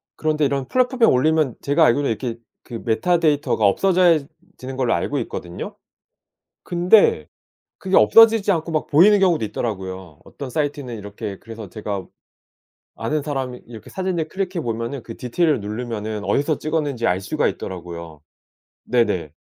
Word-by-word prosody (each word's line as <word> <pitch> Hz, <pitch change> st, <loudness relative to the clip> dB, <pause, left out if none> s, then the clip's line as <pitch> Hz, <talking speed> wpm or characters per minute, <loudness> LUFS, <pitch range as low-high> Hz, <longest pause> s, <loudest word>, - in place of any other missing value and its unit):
그런데 155 Hz, -1 st, 0 dB
이런 140 Hz, -2 st, -1 dB
플랫폼에 255 Hz, -1 st, +2 dB
올리면 150 Hz, 0 st, +2 dB
제가 145 Hz, +3 st, +3 dB
알기로는 140 Hz, +3 st, +2 dB
이렇게 115 Hz, +1 st, -3 dB, 0.3 s
그 115 Hz, -3 st, -8 dB
메타데이터가 150 Hz, -, +1 dB
없어져야 175 Hz, -, +4 dB, 0.4 s
지는 130 Hz, 0 st, -7 dB
걸로 125 Hz, -3 st, +1 dB
알고 -, -, -1 dB
있거든요? 85 Hz, 0 st, -6 dB, 0.9 s
근데 175 Hz, -, +3 dB, 0.5 s
그게 190 Hz, 0 st, 0 dB
없어지지 225 Hz, -2 st, +6 dB
않고 165 Hz, -1 st, -2 dB
막 155 Hz, -, -1 dB
보이는 195 Hz, +8 st, +6 dB
경우도 175 Hz, -9 st, +3 dB
있더라고요. 95 Hz, -7 st, -5 dB
어떤 135 Hz, -2 st, -8 dB
사이트는 145 Hz, -4 st, -3 dB
이렇게 100 Hz, -1 st, -7 dB
그래서 115 Hz, -3 st, -9 dB
제가 100 Hz, 0 st, -5 dB, 0.9 s
아는 150 Hz, +7 st, -2 dB
사람 135 Hz, -3 st, -3 dB
이렇게 110 Hz, -2 st, -11 dB
사진을 185 Hz, -4 st, -2 dB
클릭해 185 Hz, -3 st, -3 dB
보면은 115 Hz, +3 st, -4 dB
그 115 Hz, -, -9 dB
디테일을 150 Hz, +5 st, 0 dB
누르면은 110 Hz, 0 st, -4 dB
어디서 145 Hz, +2 st, +1 dB
찍었는지 150 Hz, -6 st, -2 dB
알 90 Hz, +1 st, +1 dB
수가 95 Hz, -, 0 dB
있더라고요. 85 Hz, -4 st, -7 dB, 0.6 s
네네. 105 Hz, -11 st, 0 dB
130 Hz, 370 characters per minute, -21 LUFS, 110-160 Hz, 0.9 s, 없어지지